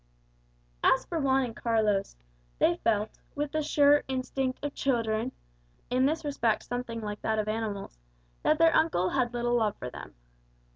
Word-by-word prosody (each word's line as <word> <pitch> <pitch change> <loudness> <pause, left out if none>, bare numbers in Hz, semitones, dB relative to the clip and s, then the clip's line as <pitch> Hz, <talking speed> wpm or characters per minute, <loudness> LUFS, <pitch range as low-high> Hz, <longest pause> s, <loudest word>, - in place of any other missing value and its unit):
As 265 - +4
for 335 - -3
Juan 270 -2 +3
and 235 -3 -5
Carlos, 215 - 0 0.4
they 170 - +3
felt, 215 +1 0 0.2
with 290 0 -2
the 310 - 0
sure 290 -1 +4
instinct 260 +1 -2
of 290 - -3
children, 230 -2 0 0.6
in 255 +2 +3
this 315 +1 -2
respect 235 -6 0
something 245 -2 -4
like 210 -1 -5
that 220 0 0
of 215 0 -1
animals, 215 - -4 0.4
that 310 - +3
their 330 0 +5
uncle 185 - +2
had 255 -3 +1
little 240 0 -1
love 215 -3 +1
for 125 - -6
them. - - -10
240 Hz, 160 wpm, -29 LUFS, 215-275 Hz, 0.6 s, their